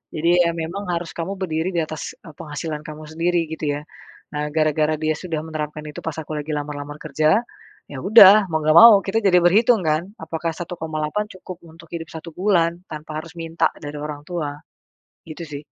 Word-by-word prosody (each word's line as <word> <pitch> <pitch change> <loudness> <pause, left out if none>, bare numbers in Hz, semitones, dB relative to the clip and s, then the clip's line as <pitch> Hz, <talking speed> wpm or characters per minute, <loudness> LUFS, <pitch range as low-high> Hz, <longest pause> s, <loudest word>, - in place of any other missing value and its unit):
Jadi 165 +2 +1
ya 170 - +1
memang 170 +5 -4
harus 170 -1 -3
kamu 180 +4 -4
berdiri 175 -2 -2
di 170 - +2
atas, 155 -1 -6
eee, 160 - -12
penghasilan 150 -1 -5
kamu 155 0 -8
sendiri 170 +2 +1
gitu 160 -1 -4
ya. - - -11 0.5
Nah, 150 0 -2
gara-gara 155 0 +2
dia 155 0 +1
sudah 165 -4 -4
menerapkan 150 -1 -5
itu 150 - -8
pas 160 -2 -4
aku 155 0 -6
lagi 150 +1 -4
lamar-lamar 145 0 -5
kerja, 155 +6 +2 0.5
ya 140 - -7
udah 205 0 +8
mau 160 -1 0
nggak 155 +1 +3
mau, 230 0 +11
kita 210 +3 +1
jadi 180 -2 +5
berhitung 220 +5 +5
kan? 155 +4 0
Apakah 160 +1 -4
1,8 160 +2 -3
cukup 185 -1 -10
untuk 165 +1 -15
hidup 165 -2 -5
1 165 +1 -8
bulan 175 -3 +1
tanpa 155 0 -6
harus 165 +1 -13
minta 165 0 0
dari 145 0 -6
orang 150 -1 -6
tua, 150 -5 -4 0.7
gitu 160 +1 -8
sih. 145 -2 -8
160 Hz, 185 wpm, -22 LUFS, 155-175 Hz, 0.7 s, mau